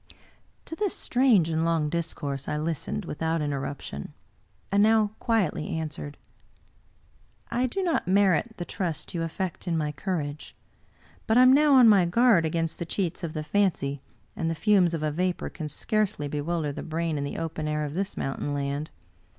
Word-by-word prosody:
To 325 - -7
this 405 +1 -2
strange 245 -10 +3
and 160 0 0
long 165 -2 +1
discourse 150 -4 -3
I 150 - -1
listened 165 +5 -3
without 165 +1 -1
interruption, 140 - -4 0.6
and 200 +1 +4
now 215 -1 +4
quietly 200 -10 0
answered: 155 -2 -5 0.7
" - - -35
I 250 +1 +1
do 385 +10 -2
not 335 - 0
merit 195 +2 +3
the 175 - -4
trust 170 -4 -3
you 170 - -2
affect 170 +2 -4
in 165 -2 +1
my 150 -1 -1
courage; 150 -2 -4 0.7
but 220 - +3
I 250 - +8
am 255 +1 +7
now 290 0 +5
on 250 -3 +8
my 200 -5 +6
guard 225 -3 +4
against 165 0 -2
the - - -1
cheats 180 -1 -2
of 160 -2 -3
the 155 - -3
fancy, 150 -7 0 0.3
and 165 - -1
the 165 - -1
fumes 180 -1 +3
of 155 - -4
a 155 - 0
vapor 180 +3 -1
can 155 -3 -6
scarcely 195 -1 -1
bewilder 150 +1 -2
the - - -6
brain 165 0 -2
in 140 - -2
the 140 - -4
open 160 -1 -3
air 150 0 -1
of 145 - -5
this 195 +4 -3
mountain 140 +1 -2
land. 140 +2 -2
165 Hz, 180 wpm, -27 LUFS, 150-200 Hz, 0.7 s, I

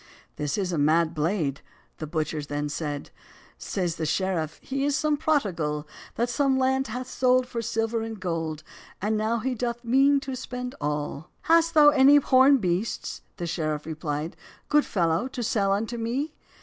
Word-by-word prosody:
"This 145 -1 -2
is 190 -3 -1
a 160 - 0
mad 160 +3 +3
blade," 155 -3 -1 0.4
the 155 - -4
butchers 155 -1 -2
then 145 0 -2
said; 145 -1 -4 0.5
Saies 175 -4 -2
the 160 - -2
sheriff, 170 -2 -1
"He 270 +1 -2
is 285 0 +1
some 305 0 +1
prodigàl, 180 - 0 0.3
That 235 - +1
some 265 +2 +1
land 265 +1 +1
has 250 +3 -5
sold 255 -1 +2
for 240 -2 -4
silver 225 0 -1
and 225 -1 -5
gold, 165 -4 -3 0.4
And 210 +3 0
now 220 +2 0
he 255 +3 -1
doth 240 0 -3
mean 270 +4 +4
to 270 -1 -5
spend 250 0 -5
all. 150 +2 -3
"Hast 330 0 +3
thou 295 -1 +8
any 280 0 +6
horn 275 0 +6
beasts," 190 0 -2 0.2
the 175 - -3
sheriff 155 -3 -2
repli'd, 155 0 -4 0.3
"Good 295 0 +4
fellow, 170 +4 +1
to 260 -2 -5
sell 200 -3 +1
unto 225 +4 -1
me?" 260 +7 -2
215 Hz, 170 wpm, -26 LUFS, 160-260 Hz, 0.5 s, thou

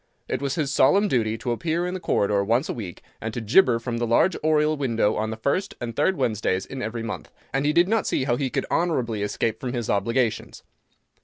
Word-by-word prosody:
It - - -2
was 140 -1 -1
his 140 -3 -1
solemn 200 +12 +4
duty 115 - 0
to 120 +1 -3
appear 165 +7 -1
in 180 - -3
the 185 - -3
corridor 100 - +1
once 115 +7 +1
a - - -2
week, 100 -8 -7 0.2
and 110 - -3
to - - -1
gibber 115 - +4
from 115 0 -4
the 120 - 0
large 160 +10 +3
oriel 155 0 +3
window 115 -7 +1
on 110 0 -1
the 110 - -5
first 160 - -1
and 115 -2 -5
third 190 +7 +2
Wednesdays 105 -6 0
in 135 -1 -7
every 115 0 -4
month, 115 - -6 0.2
and 135 +2 +1
he - - +4
did 170 +3 +4
not 220 +1 +1
see - - 0
how 125 -2 +1
he 130 +1 -1
could - - -2
honourably 125 -11 0
escape 110 +2 -1
from 125 -1 -4
his 120 -3 -2
obligations. 115 +3 -1
120 Hz, 230 wpm, -24 LUFS, 110-150 Hz, 0.2 s, solemn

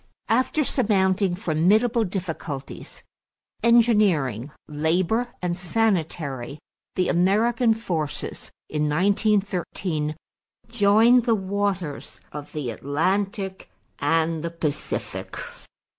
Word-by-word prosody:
After 255 +6 +2
surmounting 195 -7 +1
formidable 205 +8 +2
difficulties 165 -7 -6 0.6
engineering, 210 - +3 0.2
labor, 170 +10 +1 0.2
and 175 -1 0
sanitary 165 - -1 0.4
the 180 -1 +1
American 220 +6 +3
forces 170 -10 -4 0.2
in 150 -1 -1
1913 185 -3 0 0.5
joined 230 +2 +5
the 230 -3 +3
waters 190 - -3
of 150 0 -8
the 145 -6 -3
Atlantic 190 - -2 0.3
and 160 +2 +1
the 170 - -2
Pacific. 165 -3 -4
185 Hz, 85 wpm, -24 LUFS, 155-215 Hz, 0.6 s, joined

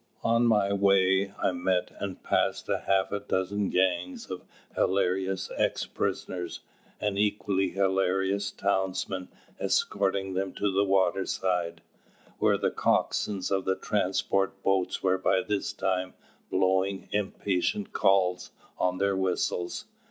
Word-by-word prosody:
On 115 +1 +3
my 105 -3 +3
way 100 0 +3
I - - +1
met 90 0 0
and 100 -2 -5
passed - - +1
half 95 -1 +1
a 100 - -1
dozen 100 0 -1
gangs 90 -1 0
of - - -4 0.3
hilarious 95 0 0
ex - - +1
prisoners 90 -2 -3 0.4
and 100 -1 -1
equally 100 -2 +1
hilarious 95 +1 +1
townsmen 95 -1 -1 0.3
escorting 95 -1 0
them 95 0 -2
to 105 - 0
the 100 +1 +3
waterside, 95 -3 0 0.6
where - - +3
the - - 0
coxswains 100 -3 0
of 95 -1 +1
the 95 - +2
transport's 95 0 0
boats 95 -2 +1
were 95 0 +2
by 95 0 +2
this 105 -2 -1
time 95 -1 -2 0.3
blowing 95 +1 +1
impatient 100 -1 -1
calls 90 -2 +2 0.3
on 90 0 +1
their 100 +1 +1
whistles. 90 -2 -1
95 Hz, 120 wpm, -28 LUFS, 95-100 Hz, 0.6 s, On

